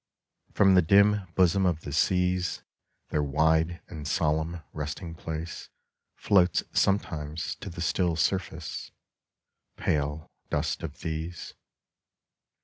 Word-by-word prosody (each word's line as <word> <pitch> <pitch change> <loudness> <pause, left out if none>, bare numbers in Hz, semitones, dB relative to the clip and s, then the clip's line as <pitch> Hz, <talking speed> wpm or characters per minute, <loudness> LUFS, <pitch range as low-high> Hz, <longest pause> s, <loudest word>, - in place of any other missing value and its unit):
From 95 -1 +5
the 90 - +7
dim 100 +3 +4
bosom 95 +1 +4
of 85 -3 0
the 70 - -6
seas 90 +3 +1 0.5
Their 75 - +1
wide 80 +4 +2
and 75 -4 -7
solemn 80 +2 0
resting 80 +3 -5
place 80 0 -6 0.5
Floats 90 -3 +3
sometimes 80 -6 0
to - - -7
the 85 0 -7
still 85 0 +1
surface 85 0 -2 0.9
Pale 75 +1 -1 0.2
dust - - -1
of - - -7
these. 80 +1 -5
85 Hz, 110 wpm, -28 LUFS, 80-90 Hz, 0.9 s, the